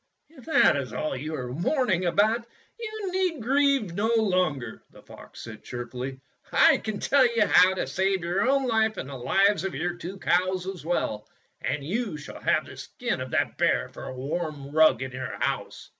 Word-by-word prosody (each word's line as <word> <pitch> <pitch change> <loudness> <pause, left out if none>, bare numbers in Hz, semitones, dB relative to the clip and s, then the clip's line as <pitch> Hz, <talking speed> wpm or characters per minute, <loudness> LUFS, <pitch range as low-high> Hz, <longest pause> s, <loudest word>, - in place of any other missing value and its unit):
''If 270 -6 -16
that 320 - +4
is 130 -5 -4
all 145 +4 -2
you 150 +4 -4
are 125 -3 -5
mourning 185 - +1
about, 215 +6 +2 0.3
you 435 -4 -5
need 365 -4 0
grieve 270 -4 +2
no 205 +5 0
longer," 185 - 0
the - - -17
fox - - -13
said 110 -2 -10
cheerfully. 125 +2 -6 0.3
"I - - +5
can 215 -1 -4
tell 280 -1 +4
you 220 -2 +4
how 185 -1 +5
to - - -1
save 190 -1 0
your 190 +8 +1
own 275 -1 +2
life 220 -2 +1
and - - -5
the 140 - -7
lives 195 +8 +2
of 195 - -3
your 175 0 -1
two 175 +3 -8
cows 185 0 +1
as 190 -4 -6
well; 130 -10 -2 0.3
and 145 - -2
you 200 - -2
shall 150 - -10
have - - +2
the - - -12
skin - - -4
of - - -5
that - - -1
bear - - +2
for - - -10
a 130 - -6
warm 145 +1 -4
rug 155 -5 +4
in 130 - -6
your 130 0 -5
house." - - -3
185 Hz, 195 wpm, -26 LUFS, 145-225 Hz, 0.3 s, I